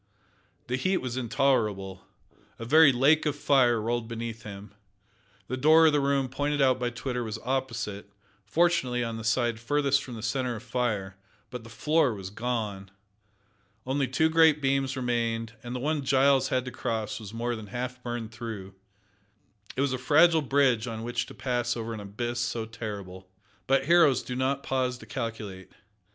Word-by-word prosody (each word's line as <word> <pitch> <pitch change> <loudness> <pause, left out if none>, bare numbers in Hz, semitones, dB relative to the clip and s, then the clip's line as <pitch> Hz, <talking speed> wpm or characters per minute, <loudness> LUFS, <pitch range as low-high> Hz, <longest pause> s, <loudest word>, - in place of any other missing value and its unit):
The 125 - -2
heat 185 +7 +1
was 125 -5 -4
intolerable. 110 -7 0 0.5
A 115 - -7
very 155 +3 +7
lake 145 +5 +3
of 150 - 0
fire 135 -5 +3
rolled 115 +1 -2
beneath 115 -1 -5
him. 100 -1 -10 0.7
The 130 - -3
door 155 +4 +6
of 155 - +5
the 145 - +3
room 140 -1 +1
pointed 145 +3 -2
out 130 -2 +3
by 125 -1 0
Twitter 125 +1 -4
was 110 -1 -4
opposite 115 -6 -3 0.3
fortunately 130 - +1
on 115 -1 -4
the 115 - -7
side 115 0 +1
furthest 140 +2 +1
from 125 - -8
the 110 - -8
centre 125 -1 -1
of 110 - -8
fire, 110 -6 -2 0.3
but 125 -2 -6
the 115 - -12
floor 145 +1 +1
was 95 -1 -7
gone. 105 -4 -3 1.0
Only 135 +1 0
two 145 +5 +2
great 160 -2 +5
beams 135 -1 0
remained, 115 -2 -1
and 120 +2 -6
the - - -3
one 150 +2 -1
Giles 135 0 +3
had 130 -1 0
to 125 - -5
cross 110 -2 -3
was 105 -3 -9
more 120 +1 -2
than 110 -2 -8
half 125 +3 -5
burned 120 -2 -5
through. 110 -4 -7 1.0
It - - +1
was 140 -2 +1
a 130 - -2
fragile 160 +5 +5
bridge 130 -5 +2
on 115 -1 -5
which 120 +1 -2
to - - -11
pass 120 -2 -1
over 115 0 -4
an 110 - -6
abyss 120 +4 -4
so 120 -2 -2
terrible. 100 -5 -7 0.4
But 135 0 +3
heroes 155 -5 +5
do 125 - -5
not 135 +2 -1
pause 130 -1 -1
to - - -13
calculate. 110 -7 -6
125 Hz, 175 wpm, -27 LUFS, 115-135 Hz, 1.0 s, very